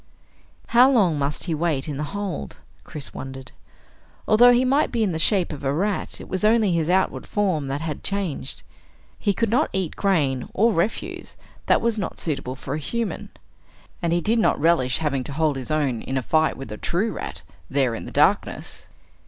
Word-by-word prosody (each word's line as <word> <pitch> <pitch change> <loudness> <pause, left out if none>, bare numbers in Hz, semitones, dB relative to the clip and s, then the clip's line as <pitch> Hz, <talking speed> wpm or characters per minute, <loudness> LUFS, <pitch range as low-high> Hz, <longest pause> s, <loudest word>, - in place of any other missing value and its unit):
How 245 +3 +6
long 190 - +3
must 140 +1 -2
he 170 - -2
wait 155 -3 -1
in 145 -3 -4
the 150 - -2
hold? 200 -3 -5 0.3
Chris 150 -5 -9
wondered. 135 -1 -8 0.8
Although 240 +3 +7
he 245 +1 +3
might 275 +4 +2
be 235 -2 +1
in 200 - +1
the 160 - -3
shape 180 0 +2
of 145 - -9
a 135 - +1
rat, 195 +7 -1
it - - -9
was 190 +2 -3
only 215 -2 +4
his 165 -1 0
outward 190 +1 +1
form 185 -9 0
that 140 +2 -3
had 160 -2 -4
changed. 190 -9 -3 0.6
He 205 - +1
could 220 +3 0
not 265 +7 +2
eat 190 -4 -2
grain 145 -10 0
or 225 +3 +4
refuse 175 +6 -2 0.3
that - - +4
was 230 -2 0
not 185 - -4
suitable 140 -5 -3
for 135 +1 -6
a 150 - -2
human, 230 +8 -3 0.7
and 170 -2 0
he 175 +1 +2
did 225 +6 +1
not - - +2
relish 145 -6 +2
having 140 -4 -1
to 140 - -5
hold 155 -1 +1
his 130 -2 -6
own 145 -7 0
in 135 - -3
a 130 - -1
fight 155 +5 +2
with 135 -5 -8
a 105 - -5
true 200 - -1
rat, 85 - -6 0.3
there 135 -4 +1
in 115 - -6
the - - -8
darkness. - - 0
165 Hz, 200 wpm, -23 LUFS, 140-205 Hz, 0.8 s, Although